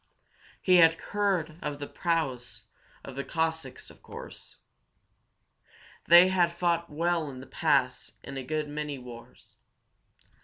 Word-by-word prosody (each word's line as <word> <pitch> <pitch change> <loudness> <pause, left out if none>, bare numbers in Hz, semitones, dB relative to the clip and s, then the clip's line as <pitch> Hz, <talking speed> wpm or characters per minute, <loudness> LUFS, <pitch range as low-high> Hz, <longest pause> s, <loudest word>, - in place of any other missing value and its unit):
He 185 -1 +4
had 165 -1 +6
heard 180 -5 -2
of 150 -1 -4
the 145 - -5
prowess 140 -8 -2 0.4
of 135 - -9
the 140 - -3
Cossacks, 160 -5 -3
of - - -20
course. - - -11 1.5
They 175 +2 +8
had 175 -2 +2
fought 170 -1 -1
well 165 0 -1
in 130 -2 -9
the 130 - -10
past 130 -2 0
in 135 - -8
a 135 - -4
good 155 +2 -2
many 150 -1 -4
wars. 120 -2 -13
155 Hz, 130 wpm, -28 LUFS, 135-170 Hz, 1.5 s, They